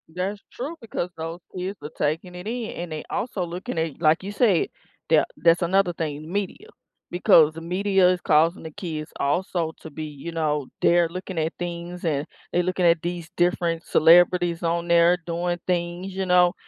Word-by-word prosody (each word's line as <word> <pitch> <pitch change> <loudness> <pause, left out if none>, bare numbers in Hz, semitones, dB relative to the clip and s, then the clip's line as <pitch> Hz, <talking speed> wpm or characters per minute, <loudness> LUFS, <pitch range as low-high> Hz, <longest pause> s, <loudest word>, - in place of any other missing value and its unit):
That's 195 +3 -3
true 285 +7 -5
because 215 -6 -4
those 165 +2 -5 0.2
kids 185 +2 -4
are 150 - -5
taking 165 +4 -1
it 180 +3 -8
in, 235 -1 -3
and 175 -1 -6
they 155 -1 -4
also 205 -6 -2
looking 175 0 -6
at 160 -1 -2
like 160 +2 +3
you 200 - -5
said, 205 -4 +2 0.4
that - - +4
that's 170 +1 +4
another 180 +1 +2
thing, 155 -1 -5
media. 205 - -3 0.4
Because 170 -4 +5
the 165 - -8
media 190 +2 +2
is 180 -1 0
causing 160 +3 +3
the 160 - -6
kids 155 -4 -6
also 165 +2 0
to 160 - -9
be, 155 +1 -7
you 150 +2 -7
know 150 -4 -1
they're 170 -1 +4
looking 185 +1 -7
at 160 +1 -1
things, 175 0 -5
and 150 -3 0 0.3
they're 175 - +2
looking 180 0 0
at 170 -1 +4
these 175 -1 -4
different 175 -1 +1
celebrities 175 +1 +4
on 170 0 0
there 170 +1 +5
doing 175 +1 -2
things, 175 +1 -2
you 190 0 -1
know, 180 -1 +4
175 Hz, 185 wpm, -24 LUFS, 165-180 Hz, 0.4 s, Because